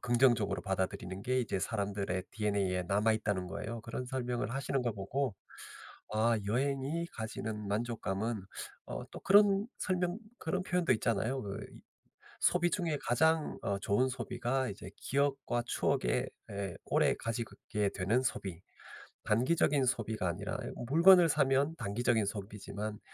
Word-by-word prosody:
긍정적으로 120 Hz, -3 st, +3 dB
받아들이는 95 Hz, 0 st, -2 dB
게 130 Hz, +2 st, +1 dB
이제 105 Hz, -5 st, -1 dB
사람들의 100 Hz, -3 st, -2 dB
DNA에 100 Hz, -3 st, 0 dB
남아있다는 105 Hz, -1 st, +1 dB
거예요. 115 Hz, +4 st, -5 dB
그런 120 Hz, +2 st, -4 dB
설명을 125 Hz, -2 st, -2 dB
하시는 135 Hz, 0 st, -1 dB
걸 120 Hz, -, 0 dB
보고 105 Hz, +4 st, -2 dB, 0.8 s
아 115 Hz, +1 st, +3 dB
여행이 140 Hz, +8 st, 0 dB
가지는 110 Hz, -1 st, -4 dB
만족감은 110 Hz, 0 st, -1 dB, 0.5 s
어 -, -, -5 dB
또 -, -, -8 dB
그런 200 Hz, 0 st, +6 dB
설명 180 Hz, +1 st, 0 dB, 0.2 s
그런 185 Hz, +3 st, -1 dB
표현도 180 Hz, -2 st, +2 dB
있잖아요. 115 Hz, +4 st, 0 dB
그 100 Hz, -1 st, -5 dB
이 -, -, -18 dB, 0.4 s
소비 175 Hz, -1 st, +2 dB
중에 165 Hz, -6 st, 0 dB
가장 160 Hz, +5 st, +2 dB
어 100 Hz, -1 st, 0 dB
좋은 125 Hz, +7 st, +2 dB
소비가 130 Hz, +1 st, -1 dB
이제 100 Hz, -, -8 dB
기억과 135 Hz, -3 st, 0 dB
추억에 60 Hz, -, +1 dB, 0.2 s
에 100 Hz, -3 st, -4 dB
오래 -, -, +3 dB
가지게 110 Hz, -2 st, -2 dB
되는 105 Hz, +7 st, +2 dB
소비. 95 Hz, -8 st, -3 dB, 0.6 s
단기적인 135 Hz, +4 st, +3 dB
소비가 110 Hz, -6 st, 0 dB
아니라 85 Hz, -, -3 dB, 0.3 s
"물건을 170 Hz, +3 st, +7 dB
사면 140 Hz, +1 st, +3 dB
단기적인 115 Hz, -1 st, +1 dB
소비지만 105 Hz, +1 st, -5 dB
115 Hz, 315 characters per minute, -33 LUFS, 100-135 Hz, 0.8 s, 물건을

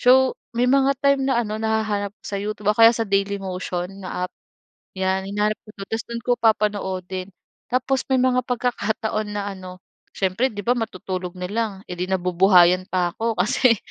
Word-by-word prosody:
So, 260 Hz, +1 st, +5 dB, 0.2 s
may 245 Hz, -, +3 dB
mga 275 Hz, 0 st, +3 dB
time 280 Hz, -1 st, +3 dB
na 240 Hz, -2 st, +2 dB
ano, 215 Hz, +1 st, -4 dB
nahahanap 215 Hz, -2 st, -1 dB
ko -, -, -48 dB
sa 200 Hz, -, -3 dB
YouTube 210 Hz, 0 st, -1 dB
o -, -, -13 dB
kaya 225 Hz, 0 st, +10 dB
sa 230 Hz, -, -1 dB
Daily 200 Hz, 0 st, +1 dB
Motion 185 Hz, 0 st, -4 dB
na 180 Hz, 0 st, -3 dB
app, -, -, -26 dB, 0.6 s
'yan. 190 Hz, 0 st, 0 dB
Hinahanap 210 Hz, +1 st, 0 dB
ko -, -, -27 dB
do'n, 200 Hz, -, -8 dB
tapos 225 Hz, -, -1 dB
do'n 235 Hz, 0 st, -5 dB
ko 245 Hz, -, +2 dB
papanoodin. 190 Hz, -4 st, 0 dB, 0.4 s
Tapos 260 Hz, +1 st, +1 dB
may 265 Hz, -, +3 dB
mga 255 Hz, -1 st, +3 dB
pagkakataon 220 Hz, -3 st, -1 dB
na 205 Hz, 0 st, -2 dB
ano, 185 Hz, -1 st, -10 dB, 0.4 s
syempre 195 Hz, +7 st, +1 dB
'di 205 Hz, -, -5 dB
ba 245 Hz, -, +5 dB
matutulog 185 Hz, -4 st, -4 dB
na 180 Hz, 0 st, -4 dB
lang, 225 Hz, 0 st, 0 dB, 0.2 s
eh -, -, -3 dB
'di 180 Hz, -, -2 dB
nabubuhayan 180 Hz, 0 st, +4 dB
pa 180 Hz, -2 st, 0 dB
ako 225 Hz, 0 st, -1 dB
kasi 240 Hz, +1 st, +4 dB
210 Hz, 185 wpm, -23 LUFS, 185-230 Hz, 0.6 s, kaya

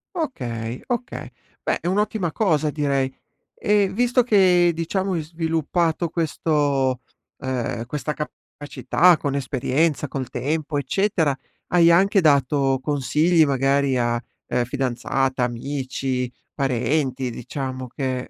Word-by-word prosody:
Okay, 120 Hz, -, -4 dB
okay. 245 Hz, +1 st, -4 dB, 0.3 s
Beh -, -, 0 dB
è 175 Hz, -, -4 dB
un'ottima 200 Hz, -2 st, 0 dB
cosa 155 Hz, -7 st, +1 dB
direi 140 Hz, -3 st, 0 dB, 0.4 s
e 205 Hz, -2 st, +2 dB
visto 245 Hz, +3 st, +2 dB
che, 185 Hz, -6 st, +4 dB
diciamo, 185 Hz, +4 st, -1 dB
hai 165 Hz, -, 0 dB
sviluppato 165 Hz, +1 st, -1 dB
questo 145 Hz, -5 st, 0 dB, 0.4 s
ehm, 120 Hz, -3 st, -3 dB
questa 150 Hz, +3 st, -3 dB
capacità 155 Hz, +3 st, +1 dB
con 140 Hz, -2 st, -2 dB
esperienza, 140 Hz, +2 st, 0 dB
col 130 Hz, -2 st, -4 dB
tempo, 145 Hz, +4 st, -2 dB
eccetera, 160 Hz, -1 st, +1 dB, 0.3 s
hai 170 Hz, -1 st, +5 dB
anche 195 Hz, +3 st, +4 dB
dato 140 Hz, -2 st, +3 dB
consigli 150 Hz, +4 st, +2 dB
magari 135 Hz, 0 st, +2 dB
a, 120 Hz, -1 st, 0 dB, 0.3 s
uhm, 125 Hz, 0 st, +1 dB
fidanzata, 130 Hz, 0 st, -1 dB
amici, 130 Hz, 0 st, -2 dB, 0.2 s
parenti, 135 Hz, 0 st, 0 dB
diciamo 130 Hz, +2 st, -5 dB
che 130 Hz, 0 st, -3 dB
145 Hz, 110 wpm, -23 LUFS, 130-170 Hz, 0.4 s, hai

